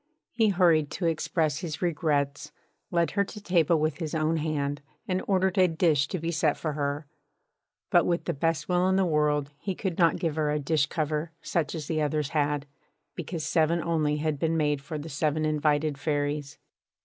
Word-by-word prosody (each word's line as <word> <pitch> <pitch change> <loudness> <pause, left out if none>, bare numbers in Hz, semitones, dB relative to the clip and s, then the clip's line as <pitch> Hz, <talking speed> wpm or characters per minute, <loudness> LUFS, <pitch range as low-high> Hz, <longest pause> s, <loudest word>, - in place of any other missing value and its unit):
He 225 -2 +2
hurried 170 -6 +3
to 180 - -3
express 160 -2 0
his 165 -5 -5
regrets, 150 -5 -1 0.4
led 170 -2 +1
her 200 - +2
to 210 - -9
table 175 -4 +2
with 155 -1 0
his 160 -2 -4
own 160 +1 +1
hand, 145 -2 -2 0.3
and 185 0 0
ordered 190 -1 +2
a 185 - +6
dish 160 -4 +2
to 185 - -3
be 165 0 -2
set 155 -2 +1
for 155 -2 -3
her; 145 +1 -2 0.9
but - - +4
with 170 0 0
the - - -1
best 160 +2 -1
will 180 0 +2
in 190 - +2
the 190 0 +3
world 150 -3 +1
he 190 +2 -3
could 190 -3 -3
not 170 -2 +4
give 160 -3 -2
her 155 -1 +1
a 150 - +1
dish 150 0 +1
cover 155 +1 -2
such 165 -1 -1
as 155 -2 -5
the 155 0 -1
others 150 -1 0
had, 145 -1 0 0.5
because 165 -4 -5
seven 165 0 +2
only 155 -3 0
had 150 -1 -1
been 165 0 +1
made 150 -2 +1
for 150 +2 -6
the 150 +2 -7
seven 155 +1 0
invited 150 -1 +1
Fairies. 145 -1 -2
155 Hz, 195 wpm, -27 LUFS, 150-170 Hz, 0.9 s, a